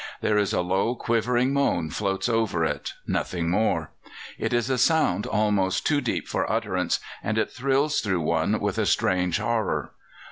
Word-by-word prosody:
There 105 -1 +2
is 100 - +1
a - - +1
low, 95 +7 0
quivering 120 +3 +1
moan 90 - +1
floats 95 0 -1
over 110 -8 +1
it 75 -2 -3
nothing 85 -2 -1
more; 90 -6 0 0.5
it - - -1
is 120 0 +1
a 130 -2 0
sound 130 - +2
almost 100 -3 +1
too 145 -2 +2
deep 120 - -2
for - - -1
utterance, - - 0 0.2
and 110 0 -1
it 110 - 0
thrills 140 +3 +1
through 95 -5 0
one 75 - +1
with - - -1
a - - +1
strange 90 -2 +1
horror. 105 - -1
105 Hz, 170 wpm, -25 LUFS, 90-120 Hz, 0.5 s, There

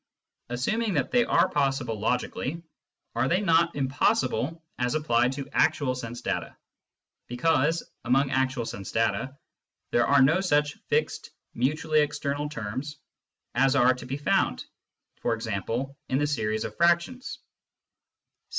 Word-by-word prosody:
(^) - - -57 0.5
Assuming 215 - 0
that 140 - 0
they 245 -1 +4
are - - +3
possible 135 -6 -1
logically, 125 +7 -2 0.5
are 120 +3 +1
they 175 +6 +2
not 170 -3 +3
impossible 135 +2 0 0.2
as 125 +2 0
applied 125 -4 +2
to 140 0 -6
actual 145 -4 +2
sense 120 -1 -6
data, - - -3 0.7
because, 160 +5 +1 0.2
among 135 +3 +2
actual 130 -2 0
sense 95 -4 -6
data, 130 +4 0 0.5
there 120 - +3
are 140 -1 +6
no 160 +7 +4
such 150 -5 +2
fixed - - -1 0.2
mutually 155 +5 +1
external 145 0 -1
terms 130 +4 -5 0.6
as 135 +2 +3
are 130 -2 +5
to 125 - -9
be 135 +2 -3
found, 145 - +1 0.6
e.g.^ 115 +4 -2
in 130 - +1
the 145 - +2
series 110 -7 -1
of - - -6
fractions 175 +9 +1
135 Hz, 130 wpm, -27 LUFS, 125-150 Hz, 0.7 s, are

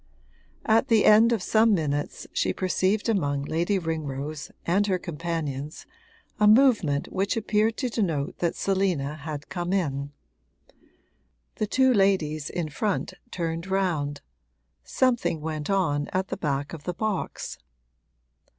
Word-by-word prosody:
At 225 +5 +3
the 225 -4 +4
end 220 +2 +7
of 225 -6 0
some 220 +1 +4
minutes 145 -3 -2
she - - +1
perceived 190 +3 0
among 145 -10 0
Lady 170 +7 0
Ringrose 155 -3 -4 0.2
and 195 +4 +2
her 190 -2 +2
companions 155 -4 -4 0.5
a 210 - +5
movement 210 - +4
which 195 +4 0
appeared 220 0 +1
to 260 - -1
denote 165 -11 -2
that 170 -1 0
Selina 185 -7 0
had 150 -1 -7
come 175 -1 -3
in. 145 -7 -1 1.5
The 215 - -1
two 260 +3 +3
ladies 175 -8 +1
in 175 -3 -3
front 200 +6 -2 0.2
turned 165 0 -3
round 160 -7 -1 0.6
something 240 -11 +1
went 155 -1 -4
on 150 -7 +1
at 185 +1 -2
the - - -3
back 145 -4 -2
of 155 -3 -9
the 180 - -3
box. 215 -1 -3
175 Hz, 130 wpm, -26 LUFS, 150-205 Hz, 1.5 s, end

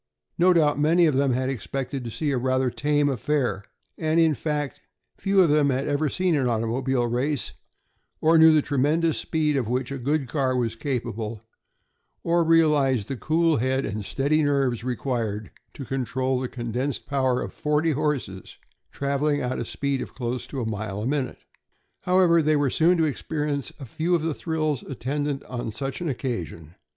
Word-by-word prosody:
No 180 +2 +6
doubt 150 -4 +3
many 165 +4 +4
of 155 - +3
them 135 -1 +2
had 130 +1 0
expected 135 +1 -4
to 120 - -5
see 145 +6 -2
a 130 - 0
rather 130 0 +1
tame 145 +3 +1
affair, 125 -6 0 0.4
and 160 0 +1
in 160 -2 +4
fact 150 -1 -3 0.4
few 195 0 +3
of 165 - +2
them 150 -1 +4
had 135 +1 0
ever 145 +1 +1
seen 180 +4 +1
an 135 -4 +1
automobile 120 +2 0
race, 125 +4 -1 0.7
or 160 +1 +4
knew 160 0 +8
the 155 -2 +4
tremendous 150 +3 +1
speed 155 -2 0
of 130 -5 0
which 125 +1 -1
a 140 - -4
good 140 +2 0
car 130 -1 0
was 115 -2 -1
capable, 115 -4 -4 0.8
or 170 0 +2
realized 150 -8 +3
the 135 - -2
cool 160 +4 +2
head 130 +3 0
and 105 0 -4
steady 140 +8 +1
nerves 135 -5 +1
required 115 -4 -3 0.2
to 135 - -7
control 130 +1 -1
the 130 - -2
condensed 125 +3 -3
power 130 -3 +1
of - - -5
forty 150 +2 +1
horses 140 - -3 0.3
traveling 140 +1 0
at 125 0 -2
a - - -1
speed 140 -2 -2
of - - -8
close 125 0 -3
to 135 - -5
a - - -2
mile 105 -1 -4
a - - -3
minute. 135 0 -2 0.6
However, 180 -2 +4
they 155 0 +2
were 145 -3 +1
soon 175 +3 +4
to 165 - +3
experience 145 -1 -2
a 135 - -7
few 160 +8 0
of 165 - -1
the 160 -1 0
thrills 155 -3 -2
attendant 140 +2 -3
on 120 -3 -5
such 135 - -5
an 170 - -1
occasion. 90 - -4
140 Hz, 180 wpm, -25 LUFS, 125-155 Hz, 0.8 s, knew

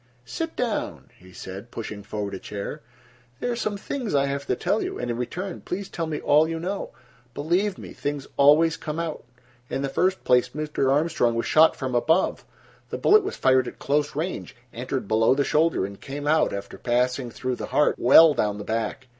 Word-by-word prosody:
"Sit 325 - -4
down," 235 -4 -3
he 95 +1 -16
said, 95 +4 -9
pushing 110 -3 -6
forward 100 0 -5
a 95 - -5
chair. 100 +1 -6 0.6
"There 245 - -1
are - - -1
some 215 -3 -2
things 235 - -3
I 140 0 +3
have 140 0 -3
to - - +1
tell - - 0
you, - - -4
and, 120 -1 -3
in 115 - -3
return, 180 +10 -4
please 195 +2 -5
tell 165 -1 -3
me 155 -2 -3
all 150 +2 +4
you 165 0 -3
know. 190 +4 -4 0.5
Believe 180 +7 0
me, - - -10
things 145 -1 -4
always 155 +3 +5
come 155 -1 -5
out. 165 -2 -4 0.5
In 135 - -2
the 140 - -1
first 185 +7 0
place, 125 0 +3
Mr. 150 -3 -1
Armstrong 140 -5 +2
was 115 - -1
shot 160 +1 +5
from 130 -2 -4
above. 160 +9 +2 0.5
The - - -4
bullet 425 +2 +5
was 400 - -4
fired 130 -1 +3
at - - -8
close 145 0 0
range, 160 -2 -4 0.2
entered 125 -1 -4
below 110 +4 +3
the 140 - +2
shoulder 155 - +2
and 100 0 -9
came 145 +1 -6
out, 155 +1 +3
after 100 0 -6
passing 125 +1 0
through 125 +1 -4
the - - -5
heart, 150 - +3
well 150 +5 +8
down 105 -6 0
the 105 - -6
back. 115 +3 -3
140 Hz, 205 wpm, -25 LUFS, 120-165 Hz, 0.6 s, well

